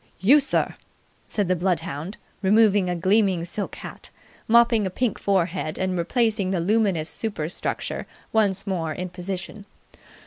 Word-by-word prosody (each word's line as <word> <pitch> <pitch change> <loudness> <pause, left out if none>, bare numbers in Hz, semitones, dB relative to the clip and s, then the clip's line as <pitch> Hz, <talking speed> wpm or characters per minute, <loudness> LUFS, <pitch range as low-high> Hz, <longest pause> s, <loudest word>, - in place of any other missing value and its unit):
"You, 245 - +6
sir!" 280 - 0 0.5
said 205 -3 -1
the 185 - +2
bloodhound, 170 -1 -2 0.2
removing 205 -2 +4
a 180 - 0
gleaming 190 -1 +2
silk 195 +3 -5
hat, - - -10 0.4
mopping 230 -2 +4
a - - -2
pink 225 +3 -1
forehead, 185 -4 0
and 185 -1 -1
replacing 210 +2 0
the 190 -2 0
luminous 190 -3 +1
superstructure 180 -8 -3 0.3
once 205 -4 +2
more 165 -5 -2
in 180 +3 -5
position. 185 +3 -6
190 Hz, 135 wpm, -24 LUFS, 175-215 Hz, 0.5 s, You